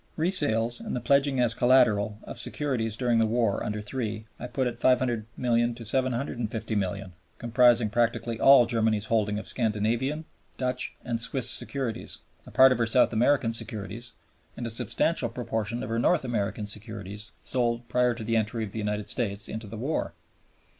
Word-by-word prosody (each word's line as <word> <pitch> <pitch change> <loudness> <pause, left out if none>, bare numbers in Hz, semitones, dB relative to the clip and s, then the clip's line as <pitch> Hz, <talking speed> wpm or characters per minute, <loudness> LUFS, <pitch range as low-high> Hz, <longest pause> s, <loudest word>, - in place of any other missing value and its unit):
Resales 120 - +1
and - - -5
the - - -1
pledging 140 +2 +2
as 120 -2 +2
collateral 115 -4 +3
of - - -7
securities 115 -7 -2
during 120 -2 +2
the 110 - +3
war 115 -2 0
under 105 0 -3 0.2
(iii.) 110 -1 -4
I 125 - -5
put 125 +2 -1
at 120 -1 -3
$500,000,000 120 -1 +1
to 120 - -9
$750,000,000, 110 -6 -2 0.3
comprising 120 -2 +3
practically 115 0 0
all 135 -3 +7
Germany's 110 -3 0
holding 105 -2 +1
of 105 - -6
Scandinavian, 115 +7 -1 0.3
Dutch, 130 -1 -2
and 115 -2 -2
Swiss 125 +3 +3
securities, 130 -5 0 0.3
a - - -9
part 130 0 +7
of 125 - +1
her 115 - +1
South 125 +1 +3
American 120 +1 +2
securities, 115 +1 -5 0.4
and 120 - -4
a 115 - -2
substantial 125 +4 0
proportion 115 -1 -3
of - - -5
her 115 +1 -1
North 155 +4 +2
American 105 -3 -2
securities 105 0 -6
sold 120 -2 0
prior 125 -1 +2
to 115 - -6
the 115 +1 -1
entry 110 +1 0
of 105 - -6
the 110 - -5
United 105 -1 -2
States 100 -5 -2
into 110 0 -6
the 110 +2 -8
war. 135 +8 -2
115 Hz, 165 wpm, -27 LUFS, 110-125 Hz, 0.4 s, all